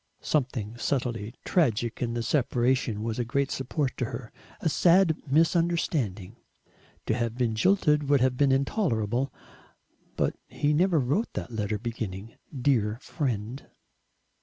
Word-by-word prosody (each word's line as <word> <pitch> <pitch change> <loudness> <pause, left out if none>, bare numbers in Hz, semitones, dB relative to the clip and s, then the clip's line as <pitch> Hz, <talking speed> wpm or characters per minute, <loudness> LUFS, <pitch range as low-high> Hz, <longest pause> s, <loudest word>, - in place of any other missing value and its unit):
Something 125 -6 -1
subtly 120 -4 -2
tragic 120 - +1
in 120 -1 -1
the 120 - -1
separation 120 -4 +1
was 115 +1 -2
a - - +1
great 135 +4 -1
support 135 +1 -2
to 125 - 0
her, 115 0 -7 0.3
a - - -1
sad 170 +1 +4
misunderstanding. 150 - +1 0.7
To - - +1
have 115 -1 -1
been 120 -3 +1
jilted 150 - +2
would 145 -1 +5
have 130 0 +2
been 140 +1 +3
intolerable. 135 - 0 0.8
But - - 0
he 150 +1 0
never 175 +1 +3
wrote 145 - 0
that - - -5
letter 105 -1 -1
beginning 110 -2 -5 0.2
"Dear 120 -6 +1
Friend." 125 -3 -3
125 Hz, 135 wpm, -27 LUFS, 115-145 Hz, 0.8 s, would